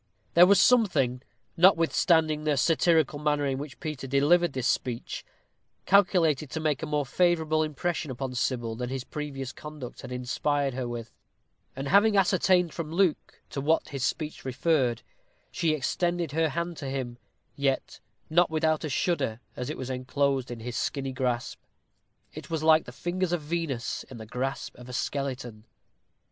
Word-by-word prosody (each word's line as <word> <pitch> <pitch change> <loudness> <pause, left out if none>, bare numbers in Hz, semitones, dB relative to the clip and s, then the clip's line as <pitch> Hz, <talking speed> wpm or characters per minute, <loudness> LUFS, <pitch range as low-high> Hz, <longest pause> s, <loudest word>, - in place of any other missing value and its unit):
There 175 +1 +8
was 200 0 +6
something, 155 - +3 0.3
notwithstanding 165 -3 +4
the 150 -2 +1
satirical 160 0 +3
manner 150 -1 +1
in 135 -1 -1
which 145 -1 -8
Peter 150 -5 -5
delivered 145 +5 +3
this 130 -2 -3
speech, 125 -3 -2 0.6
calculated 175 -7 +3
to 160 - -4
make 150 -5 0
a - - -3
more 150 -1 0
favorable 160 +1 +2
impression 155 +1 -2
upon 130 0 -4
Sybil 120 -2 -1
than 125 +1 -4
his 130 -1 -3
previous 135 -3 -5
conduct 150 -5 -9
had 130 - -9
inspired 135 +2 -1
her 130 -1 -3
with; 120 -1 -6 0.6
and, 135 +1 -4
having 205 +5 +5
ascertained 185 -2 +3
from 160 -2 -5
Luke 175 -2 0
to 140 - -3
what 160 +4 +1
his 135 -3 -4
speech 155 +3 -2
referred, 130 -2 +1 0.5
she 165 - +1
extended 170 +3 -1
her 160 +1 +1
hand 170 +3 -3
to 140 - -5
him, 125 -3 -4 0.4
yet 135 -1 -1 0.3
not 175 +2 +3
without 155 0 +1
a 155 - -2
shudder, 135 -6 0 0.2
as 125 +2 -4
it 155 - -4
was 130 0 -5
enclosed 135 +1 0
in 120 -2 -7
his 120 +1 -5
skinny 135 -1 -2
grasp. 125 -2 -2 0.7
It - - -9
was 160 -2 -2
like 160 0 +5
the - - -9
fingers 175 +6 -2
of 175 - 0
Venus 150 -6 -3
in 130 - -9
the 110 - -8
grasp 130 +4 -4
of 125 0 -11
a - - -7
skeleton. 125 -4 -3
145 Hz, 165 wpm, -27 LUFS, 130-165 Hz, 0.7 s, There